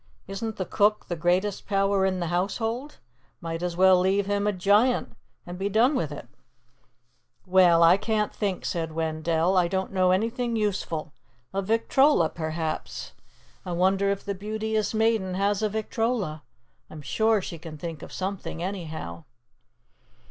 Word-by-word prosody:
Isn't 210 +3 -4
the 185 - -3
cook 210 +3 +2
the 175 - -1
greatest 180 +4 0
power 195 -1 +2
in 185 -1 -1
the 170 -2 -2
household? 225 +9 -2 0.4
Might 165 0 -5
as 175 -1 -3
well 185 0 +6
leave 190 +2 +2
him 205 +1 0
a - - +3
giant 205 +6 +2 0.3
and 175 +1 -8
be 195 +1 -1
done 230 +7 +3
with 260 - -1
it!" - - -8 1.2
"Well, 180 -3 +5
I 170 +3 +7
can't 210 0 -1
think," 200 -4 -2
said 165 -2 -2
Wendell. 160 +2 0
"I 180 -2 +4
don't 190 +1 -2
know 185 -1 +3
anything 230 +5 0
useful. 185 -8 -2 0.4
A 195 - 0
victrola, 225 - +3
perhaps. 160 0 -4 0.5
I 180 -3 -4
wonder 190 +3 +2
if 200 0 -2
the 200 - -2
Beauteous 215 +2 -2
Maiden 220 -4 +1
has 200 +1 +1
a 215 - +1
victrola. 220 -6 -2 0.5
I'm 155 -1 -10
sure 220 - +2
she 170 -3 -7
can 160 -1 -9
think 160 0 -6
of - - -10
something, 190 -3 -4
anyhow." 160 - -5
190 Hz, 155 wpm, -26 LUFS, 170-210 Hz, 1.2 s, I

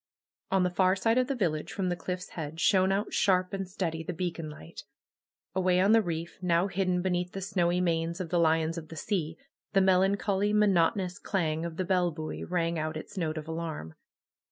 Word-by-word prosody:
On 190 -1 +3
the 180 - +1
far 185 +1 +3
side 225 +5 +2
of 255 - +1
the 275 - -1
village 165 -9 -1
from 190 -2 -1
the 175 - 0
cliff^s 180 +1 -5
head 160 -1 -6
shone 190 0 +4
out 200 +2 -1
shar}) 185 -2 +3
and 195 -1 -3
steady 165 -4 -2
the 170 +2 -4
beacon 165 -2 -3
light. 115 - -10 0.7
Away 185 -1 +2
on 195 +3 +4
the 225 0 +6
reef, 170 -3 -4
now 175 0 +2
hidden 185 -2 0
beneath 180 -1 -1
the 195 - -4
snowy 180 -2 +1
manes 170 0 0
of 180 -3 -4
the 175 0 +2
lions 160 0 +2
of 160 - -11
the 165 - -10
sea, 165 -2 -2 0.4
the 195 - +5
melancholy, 195 +2 +2
monotonous 190 -2 +2
clang 165 -5 -1
of 165 -1 -6
the 185 - -1
bell 180 -1 +2
buoy 155 -1 -5
rang 170 -2 -1
out 155 0 -2
its 155 - -9
note 160 -4 -2
of 155 0 -6
alarm. 160 - -5
180 Hz, 205 wpm, -29 LUFS, 165-190 Hz, 0.7 s, the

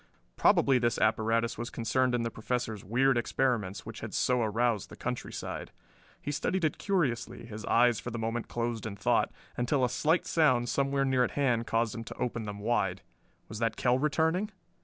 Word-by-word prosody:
Probably 135 -2 +4
this 120 -1 +1
apparatus 115 +1 +1
was 120 - -3
concerned 125 +2 +1
in 120 - 0
the 115 - -2
Professor's 110 -2 -3
weird 130 +5 +3
experiments 115 -5 -1
which 115 0 -7
had 110 -2 -6
so 125 -1 +2
aroused 110 -1 0
the - - -10
countryside. - - -5 0.5
He 145 - -4
studied 165 +4 0
it 155 - -1
curiously, 150 - -1
his 110 -2 -7
eyes 120 -2 +4
for - - -5
the 120 - -5
moment 115 +1 -2
closed 115 -1 -2
in 100 - -6
thought, - - +1 0.2
until 125 +2 +1
a - - -1
slight 155 +7 +1
sound 130 -7 +3
somewhere 140 0 +1
near 130 -2 +3
at - - -1
hand 120 -5 +1
caused 115 -1 +1
him 115 - -5
to - - -8
open 115 -2 -2
them 105 -1 -5
wide. 100 -4 0 0.4
Was 105 - -7
the 115 -1 +2
Kell 125 +3 +1
returning? 160 +7 +1
120 Hz, 185 wpm, -30 LUFS, 115-130 Hz, 0.5 s, Probably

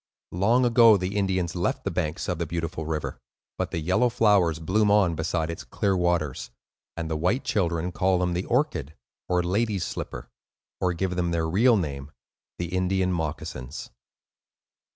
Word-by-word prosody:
Long 115 +8 +3
ago, 115 -3 +6
the 95 +2 -3
Indians 95 -4 0
left 90 0 -1
the 100 - -2
banks 80 -1 -2
of 90 -2 -2
the 85 - -2
beautiful 80 -1 -4
river, 75 -5 -3 0.4
but - - -2
the - - -4
yellow 90 +10 +2
flowers 105 -9 +3
bloom 100 +6 +1
on 100 -4 +4
beside 80 0 -1
its 85 - -7
clear 100 -1 0
waters; 85 -8 0 0.5
and 85 -1 -3
the 80 - -2
white 90 - 0
children 85 -3 0
call 95 +1 +2
them 90 0 0
the 90 +2 -2
"Orchid," 125 - -1 0.3
or 90 -1 +2
"Lady's 100 0 0
Slipper," - - -6 0.5
or 90 -1 +1
give 90 +1 -2
them 90 -1 0
their 85 -1 0
real 110 +8 +4
name, 70 -5 -4 0.5
the 85 +1 -3
"Indian 95 0 +1
Moccasins." 75 -5 -5
90 Hz, 165 wpm, -26 LUFS, 80-100 Hz, 0.5 s, ago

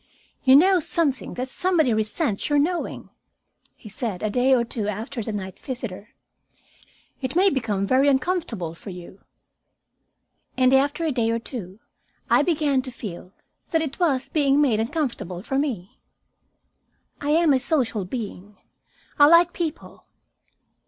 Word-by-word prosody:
"You 260 -1 +7
know 370 +5 +6
something 295 -4 -1
that 255 +1 -3
somebody 315 -4 +1
resents 215 - -1
your 290 - +3
knowing," 335 +5 -1 0.6
he - - -14
said, 215 -2 -4
a 215 - 0
day 250 +4 +2
or 240 - +2
two 225 -3 -3
after 225 +5 -4
the 220 - -4
night 190 -3 -6
visitor. 235 -6 -7 1.1
"It 260 +2 -3
may 380 +2 +4
become 215 - -1
very 260 +6 +3
uncomfortable 265 - 0
for 170 - -11
you." 180 +1 -11 1.4
And, 255 0 +4
after 280 +4 +2
a 315 - +1
day 235 -4 0
or 230 - +1
two, 220 -5 -7 0.5
I - - +6
began 295 -5 +1
to 255 - -6
feel 185 -6 -8 0.4
that 325 -1 +1
it 285 0 -6
was 275 -7 +1
being 285 -2 +2
made 255 -8 +3
uncomfortable 225 - -3
for 270 +3 -1
me. 230 -11 -4 1.2
I 290 - -2
am 320 -1 +4
a 265 - +3
social 250 - 0
being; 205 -2 -7 0.6
I 290 - +8
like 335 +2 +6
people. 330 -3 -6
260 Hz, 145 wpm, -24 LUFS, 215-295 Hz, 1.4 s, I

